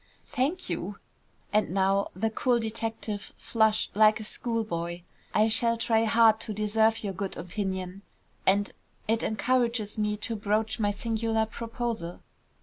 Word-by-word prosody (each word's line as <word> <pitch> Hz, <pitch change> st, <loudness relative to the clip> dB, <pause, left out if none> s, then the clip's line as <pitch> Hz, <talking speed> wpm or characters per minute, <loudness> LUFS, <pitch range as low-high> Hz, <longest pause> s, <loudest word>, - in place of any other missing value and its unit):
"Thank 290 Hz, +9 st, -1 dB
you." 180 Hz, +3 st, -3 dB, 0.6 s
And 215 Hz, 0 st, +3 dB
now 195 Hz, +1 st, +2 dB
the 220 Hz, +4 st, 0 dB
cool 245 Hz, +2 st, +2 dB
detective 225 Hz, -2 st, -3 dB
flushed 220 Hz, -3 st, +1 dB
like 215 Hz, +1 st, +5 dB
a -, -, -5 dB
schoolboy. 195 Hz, -7 st, -3 dB, 0.3 s
"I 215 Hz, +1 st, +4 dB
shall 230 Hz, +1 st, +2 dB
try 225 Hz, -1 st, +2 dB
hard 225 Hz, 0 st, +5 dB
to 215 Hz, -, -4 dB
deserve 220 Hz, +2 st, +2 dB
your 200 Hz, -2 st, -2 dB
good 195 Hz, +1 st, -4 dB
opinion, 190 Hz, +1 st, -4 dB, 0.4 s
and 200 Hz, +2 st, +3 dB, 0.4 s
it 225 Hz, +1 st, +2 dB
encourages 230 Hz, -2 st, 0 dB
me 210 Hz, 0 st, 0 dB
to 225 Hz, +2 st, -3 dB
broach 215 Hz, +2 st, 0 dB
my 205 Hz, -2 st, +2 dB
singular 225 Hz, +1 st, 0 dB
proposal. 230 Hz, -5 st, -4 dB
220 Hz, 140 wpm, -28 LUFS, 205-225 Hz, 0.6 s, like